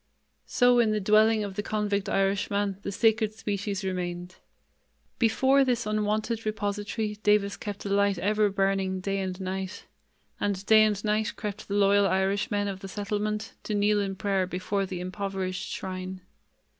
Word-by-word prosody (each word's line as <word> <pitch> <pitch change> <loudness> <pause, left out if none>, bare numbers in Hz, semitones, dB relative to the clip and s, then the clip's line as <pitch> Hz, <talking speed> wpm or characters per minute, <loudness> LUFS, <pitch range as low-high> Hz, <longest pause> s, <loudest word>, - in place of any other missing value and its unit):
So 245 0 +4
in 230 -2 +4
the 215 0 +1
dwelling 215 +2 +4
of 200 -1 -5
the 205 - -1
convict 205 -1 -1
Irishman 195 0 0
the 200 - -4
Sacred 220 +1 +2
Species 205 -2 -3
remained. 180 -1 -4 0.8
Before 265 +4 +4
this 245 -4 0
unwonted 215 +2 -1
repository 210 0 -2
Davis 210 -1 +3
kept 205 -1 -7
a - - -2
light 200 -1 +2
ever 210 +3 +2
burning 195 -1 0
day 195 +1 -2
and 185 -1 -3
night; 190 0 -4 0.5
and 200 -1 -1
day 215 +1 +7
and 205 -2 -1
night 215 +1 0
crept 210 0 -6
the 200 - -2
loyal 200 0 +4
Irishmen 200 +2 0
of 195 -1 -4
the 195 - -8
settlement 210 +2 -3
to 215 - -3
kneel 205 0 +3
in 195 -1 -3
prayer 195 -1 0
before 195 +2 -2
the 180 -1 -5
improvised 185 0 -3
shrine. 185 0 -5
205 Hz, 155 wpm, -27 LUFS, 195-215 Hz, 0.8 s, day